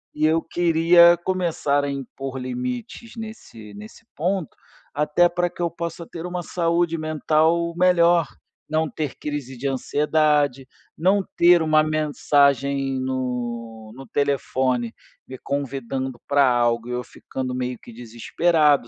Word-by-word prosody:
E 155 Hz, +1 st, +1 dB
eu 160 Hz, +1 st, +3 dB
queria 170 Hz, +1 st, +5 dB
começar 165 Hz, -6 st, 0 dB
a 140 Hz, -, -2 dB
impor 135 Hz, 0 st, -6 dB
limites 125 Hz, -, -5 dB
nesse 115 Hz, -, -10 dB
nesse 105 Hz, +1 st, -12 dB
ponto, 180 Hz, +1 st, -2 dB, 0.4 s
até 150 Hz, +4 st, +2 dB
pra 175 Hz, 0 st, -1 dB
que 175 Hz, -, -10 dB
eu 170 Hz, -, +1 dB
possa 170 Hz, 0 st, -6 dB
ter 170 Hz, 0 st, -8 dB
uma 180 Hz, 0 st, -4 dB
saúde 170 Hz, 0 st, 0 dB
mental 155 Hz, +2 st, +1 dB
melhor, 175 Hz, -2 st, +4 dB, 0.4 s
não 155 Hz, 0 st, 0 dB
ter 150 Hz, -4 st, -4 dB
crise 140 Hz, -4 st, -5 dB
de 135 Hz, -, -8 dB
ansiedade, 145 Hz, -1 st, +1 dB, 0.3 s
não 190 Hz, +4 st, +2 dB
ter 175 Hz, 0 st, +6 dB
uma 155 Hz, -1 st, +4 dB
mensagem 140 Hz, -3 st, +1 dB
no 120 Hz, -4 st, -4 dB
no 135 Hz, 0 st, -10 dB
telefone 130 Hz, -4 st, -1 dB, 0.3 s
me 130 Hz, -, -8 dB
convidando 135 Hz, -2 st, -4 dB
para 140 Hz, -1 st, +4 dB
algo 120 Hz, -1 st, +1 dB
e -, -, -4 dB
eu 125 Hz, 0 st, -2 dB
ficando 130 Hz, -1 st, -6 dB
meio 125 Hz, -1 st, -3 dB
que 120 Hz, -, -13 dB
desesperado, 140 Hz, +5 st, +1 dB
145 Hz, 135 wpm, -23 LUFS, 130-170 Hz, 0.4 s, ter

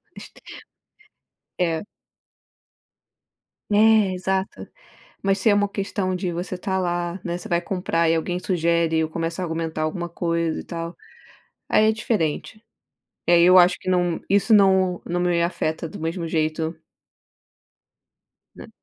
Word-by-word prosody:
É -, -, -20 dB
est -, -, -12 dB, 1.4 s
É. -, -, -14 dB, 1.9 s
É 215 Hz, -2 st, +5 dB
exato, 190 Hz, +1 st, -3 dB, 0.5 s
mas 195 Hz, 0 st, +1 dB
se 200 Hz, +3 st, +2 dB
é -, -, +5 dB
uma 205 Hz, 0 st, +2 dB
questão 195 Hz, -2 st, -2 dB
de 180 Hz, -1 st, -2 dB
você 180 Hz, +2 st, -4 dB
tá 190 Hz, +1 st, -2 dB
lá, 175 Hz, 0 st, -2 dB
né? 175 Hz, -1 st, -3 dB
Você 180 Hz, -, -9 dB
vai 170 Hz, 0 st, +1 dB
comprar 170 Hz, -2 st, 0 dB
e 165 Hz, -, +3 dB
alguém 175 Hz, +2 st, -2 dB
sugere 170 Hz, -3 st, +1 dB
ou 155 Hz, -, -3 dB
começa 165 Hz, +2 st, -3 dB
a -, -, -1 dB
argumentar 160 Hz, -1 st, -3 dB
alguma 175 Hz, +2 st, -3 dB
coisa, 170 Hz, -1 st, -1 dB
e -, -, -7 dB
tal, 170 Hz, 0 st, -6 dB, 0.7 s
aí 215 Hz, -, +4 dB
é -, -, +4 dB
diferente. 215 Hz, 0 st, -2 dB, 0.6 s
E -, -, +1 dB
aí 170 Hz, -1 st, +6 dB
eu 180 Hz, +1 st, +7 dB
acho 185 Hz, 0 st, +6 dB
que -, -, -8 dB
não 175 Hz, -2 st, +1 dB
isso 200 Hz, +1 st, +2 dB
não 190 Hz, -3 st, +4 dB
não 175 Hz, +1 st, -1 dB
me 175 Hz, -1 st, +1 dB
afeta 165 Hz, -1 st, -2 dB
do -, -, -10 dB
mesmo 165 Hz, +2 st, -3 dB
jeito. 160 Hz, 0 st, -1 dB, 1.8 s
Né. -, -, -11 dB
175 Hz, 150 wpm, -23 LUFS, 165-190 Hz, 1.9 s, eu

